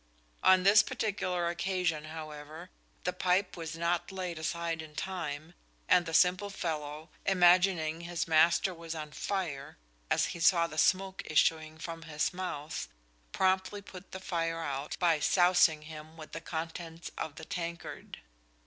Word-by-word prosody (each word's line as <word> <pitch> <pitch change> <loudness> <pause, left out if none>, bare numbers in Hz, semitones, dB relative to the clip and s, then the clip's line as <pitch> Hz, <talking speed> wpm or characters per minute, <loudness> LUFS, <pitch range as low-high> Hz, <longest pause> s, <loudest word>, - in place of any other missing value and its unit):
On 185 -1 +6
this 200 +2 +8
particular 190 -8 -1
occasion, 175 -3 -1
however, 155 +2 -8 0.3
the 180 - -1
pipe 185 +1 +1
was 165 -2 -6
not 170 +2 0
laid 180 -4 -4
aside 165 0 -2
in 155 -1 -11
time, 165 -4 -4 0.3
and 180 -1 +4
the 165 - -4
"Simple 185 +3 +4
Fellow," 155 -4 -4
imagining 175 -3 +4
his 170 -1 -3
master 165 +3 +4
was 165 -1 -7
on 155 -1 -6
fire, 160 -7 -3 0.3
as - - +3
he - - -8
saw 170 0 +5
the 155 -2 -4
smoke 190 +3 +2
issuing 155 0 +2
from 165 0 -6
his 155 +1 -1
mouth, 170 -5 -4 0.4
promptly 190 +2 +1
put 190 -1 -12
the 190 - -6
fire 165 -3 -2
out 140 -1 -3
by 165 -3 +3
sousing 175 -2 +4
him 155 +1 -10
with 155 -1 -10
the 165 - -6
contents 165 +1 -6
of 155 -2 -5
the 160 - -9
tankard. 170 0 -6
170 Hz, 150 wpm, -31 LUFS, 160-185 Hz, 0.4 s, this